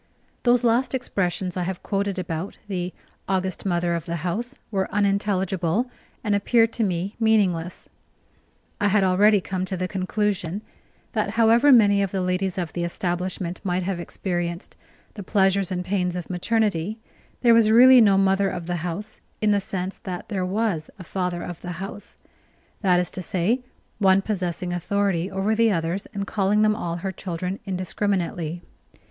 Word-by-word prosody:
Those 245 0 +3
last 240 +3 +2
expressions 185 -7 -1
I 180 - -1
have 180 +1 -4
quoted 200 -1 -1
about 170 +1 -4
the 180 -2 -3 0.4
"august 190 0 -1
Mother 175 -1 +1
of 170 -2 -3
the 170 -1 -4
house" 235 +9 -3
were 190 -2 -1
unintelligible, 200 +1 0 0.3
and 210 -3 +1
appeared 225 +3 +3
to 230 - 0
me 185 0 -2
meaningless. 190 -7 +1 0.9
I 205 - +2
had 205 0 +3
already 200 +3 +5
come 185 0 -3
to 190 0 -4
the 185 +1 -1
conclusion 195 -1 -2 0.5
that 215 -4 0
however 235 +5 +5
many 205 -5 +6
of 195 - 0
the 190 0 -2
ladies 180 +1 -1
of 175 -3 -3
the 175 - -2
establishment 175 +1 -3
might 180 -1 0
have 185 -1 -2
experienced 175 0 -4 0.4
the 210 - -7
pleasures 195 -1 +2
and 180 -1 -2
pains 180 -2 0
of 180 0 -5
maternity, 210 0 0 0.4
there 235 -2 +6
was 230 -2 +5
really 250 +3 +8
no 200 -3 +5
mother 195 0 +3
of 175 -2 -5
the 175 0 -2
house 175 +6 -5 0.2
in 215 -1 +2
the 200 -1 +2
sense 190 0 -4
that 180 -2 -6
there 195 -4 -1
was 190 -4 -1
a 185 - -9
father 180 -1 -3
of 175 -2 -7
the 180 0 -5
house: 195 +4 -7 0.7
that 180 -4 +4
is 180 - -1
to 185 - -5
say, 190 +8 0 0.4
one 195 -1 +4
possessing 180 -4 -2
authority 190 0 0
over 195 +2 0
the 225 0 +3
others 170 +2 -1
and 200 0 -3
calling 205 +1 +2
them 215 0 +3
all 170 -6 -3
her 190 +3 -3
children 180 +1 -4
indiscriminately. 180 -3 -2
190 Hz, 165 wpm, -24 LUFS, 180-210 Hz, 0.9 s, really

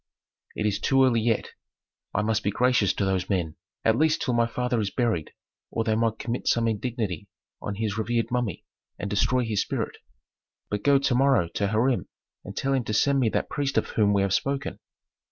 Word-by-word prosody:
"It 105 - -2
is 105 -1 +1
too 135 -1 +4
early 120 -3 +3
yet. 115 -1 0 0.6
I 105 - 0
must 110 0 +1
be 100 - 0
gracious 120 -2 +3
to 100 - -1
those 95 -1 0
men, 85 -6 -1 0.3
at 110 - +4
least 155 0 +2
till 125 - 0
my 120 0 +3
father 125 0 -1
is 105 -3 0
buried 110 -9 -1 0.4
or 115 - -1
they 110 - +1
might 115 0 +1
commit 120 +2 -4
some 115 -1 +3
indignity 110 -5 -2 0.3
on 100 - -4
his 110 0 -2
revered 115 +1 0
mummy, 120 -7 -2 0.3
and 100 - -4
destroy 125 +5 +2
his 110 -3 0
spirit. - - -3 0.7
But 105 -1 -1
go 140 +3 +5
to 135 -1 +1
morrow 130 -9 +3
to 100 +4 -1
Hiram 115 +5 +1 0.4
and 100 - -9
tell 135 0 0
him 130 -2 +1
to 105 - -2
send 140 +4 +3
me 120 -4 +3
that - - -1
priest 140 -2 -2
of - - +1
whom 105 -2 +2
we 100 -1 +3
have 100 -1 0
spoken." 140 +4 -1
115 Hz, 205 wpm, -26 LUFS, 105-125 Hz, 0.7 s, go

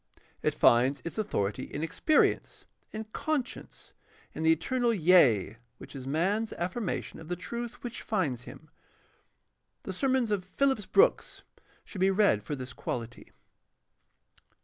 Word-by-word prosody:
It - - 0
finds 125 +4 +4
its 170 - -5
authority 130 - -1
in 150 - -5
experience, 300 - +1 0.3
in 220 0 -5
conscience, 295 -5 -4 0.4
in - - -6
the 160 0 +4
eternal 240 +10 +1
yea, 155 - +4 0.2
which - - -12
is 130 -1 -7
man's 195 +10 0
affirmation 185 +4 -3
of 160 - -11
the 175 - -2
truth 235 +6 -6
which 240 -1 -6
finds 145 - -2
him. - - -12 1.1
The 190 - -5
sermons 255 +2 +1
of 200 -3 0
Phillips 240 +2 0
Brooks 470 +5 +2 0.4
should 190 - -8
be 190 - +5
read 195 - +3
for 145 +8 -4
this 130 -1 -7
quahty. 120 -1 -6
185 Hz, 135 wpm, -29 LUFS, 140-225 Hz, 1.1 s, be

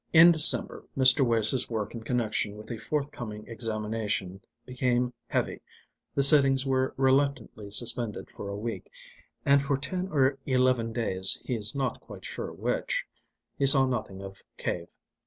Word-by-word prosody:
In 165 +1 +8
December 160 -3 +5
Mr. 130 +1 +5
Wace's 115 +1 +2
work 110 -3 -4
in 115 - -7
connection 110 -3 -2
with 110 +2 -11
a 115 - -6
forthcoming 120 -5 -5
examination 110 -4 -3 0.2
became 125 -1 -1
heavy, - - -3 0.5
the 140 - +2
sittings 135 -2 +6
were 130 -1 -1
reluctantly 135 -5 -1
suspended 115 0 0
for 100 - -8
a 100 - -6
week, 115 +2 -6 0.6
and 140 0 +4
for 140 0 -1
ten 180 +7 -4
or 135 -5 0
eleven 130 -3 +1
days 95 -5 -1
he 130 - -3
is 110 0 0
not 135 -1 -3
quite - - -13
sure - - -6
which - - -3 0.5
he 140 - +2
saw 135 -1 +8
nothing 110 -6 -5
of 95 0 -10 0.2
Cave. 85 -1 -4
125 Hz, 150 wpm, -27 LUFS, 110-135 Hz, 0.6 s, In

